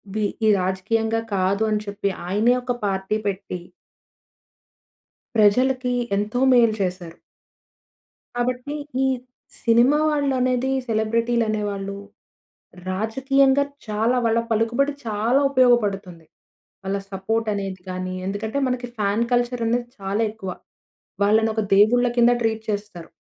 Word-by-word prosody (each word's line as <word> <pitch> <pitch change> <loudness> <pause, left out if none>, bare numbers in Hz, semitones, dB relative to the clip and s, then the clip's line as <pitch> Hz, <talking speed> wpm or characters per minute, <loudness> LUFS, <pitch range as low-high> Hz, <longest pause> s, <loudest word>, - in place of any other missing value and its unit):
వి 215 -1 +1 0.2
ఇవి 215 - +6
రాజకీయంగా 220 +4 0 0.2
కాదు 195 +3 +1
అని 210 0 +1
చెప్పి 200 0 -2 0.2
ఆయనే 215 +6 +3
ఒక 245 -1 -1
పార్టీ 190 +2 -1
పెట్టి 190 -2 -4 1.7
ప్రజలకి 250 +4 +3 0.2
ఎంతో 210 +4 -1
మేలు 235 -3 +5
చేశారు. 180 -2 -3 1.2
కాబట్టి 250 +3 -2 0.3
ఈ - - +3 0.6
సినిమా 240 +5 +4
వాళ్ళనేది 265 -3 +1 0.2
సెలబ్రిటీలు 230 +2 +1
అనేవాళ్ళు, 200 -2 -3 0.9
రాజకీయంగా 265 +7 +2 0.2
చాలా 220 +4 +1
వాళ్ళ 230 0 +3
పలుకుబడి 235 +6 +1
చాలా 220 +5 +1
ఉపయోగపడుతుంది. 205 -10 +2 0.6
వాళ్ళ 195 +1 -1
సపోర్ట్ 220 +4 -1
అనేది 195 -2 -5
గాని 185 0 -4
ఎందుకంటే 215 +5 -3
మనకి 250 -1 -2
ఫాన్ 205 +3 +1
కల్చర్ 245 -1 0
అనేది 240 +1 0
చాలా 195 +3 -1
ఎక్కువ. 215 -4 -7 0.8
వాళ్ళని 220 +2 +3
ఒక 220 - +1
దేవుళ్ళ 245 +4 +5
కింద 240 0 +6
ట్రీట్ 220 -1 -1
చేస్తారు. 205 -5 -5
220 Hz, 110 wpm, -22 LUFS, 200-245 Hz, 1.7 s, ఇవి